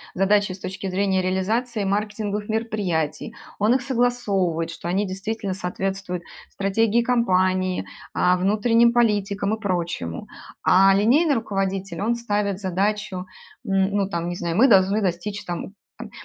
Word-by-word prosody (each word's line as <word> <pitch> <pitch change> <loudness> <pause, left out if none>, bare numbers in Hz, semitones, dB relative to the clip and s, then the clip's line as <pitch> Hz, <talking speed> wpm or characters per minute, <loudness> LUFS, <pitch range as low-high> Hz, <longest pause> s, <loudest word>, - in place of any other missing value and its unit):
задачи 200 +1 +2
с 185 - -8
точки 190 +1 -5
зрения 190 0 +1
реализации 210 +5 -1
маркетинговых 210 +1 -2
мероприятий, 215 -5 -2 0.2
он 215 +4 +3
их 265 - +1
согласовывает, 215 -10 0
что 170 +1 -7
они 195 +3 0
действительно 195 +1 -4
соответствуют 185 -1 -4 0.3
стратегии 215 +4 +1
компании, 185 -6 +1 0.3
а, 180 0 +3
внутренним 230 +5 +3
политикам 205 -3 +1
и - - -14
прочему. 175 - -3 0.4
А 195 +1 +6
линейный 270 - +3
руководитель, 195 -4 -2
он 230 +3 +1
ставит 205 -4 -1
задачу, 195 0 -1 0.4
н 195 +1 +1
ну, 200 -1 +1
там, 170 -2 -3
не 175 - -3
знаю: 170 -1 -3
"Мы 260 +5 +6
должны 195 0 +4
достичь, 200 +2 -2
там, 175 +3 -5 0.2
там, - - -8
200 Hz, 135 wpm, -23 LUFS, 185-215 Hz, 0.4 s, А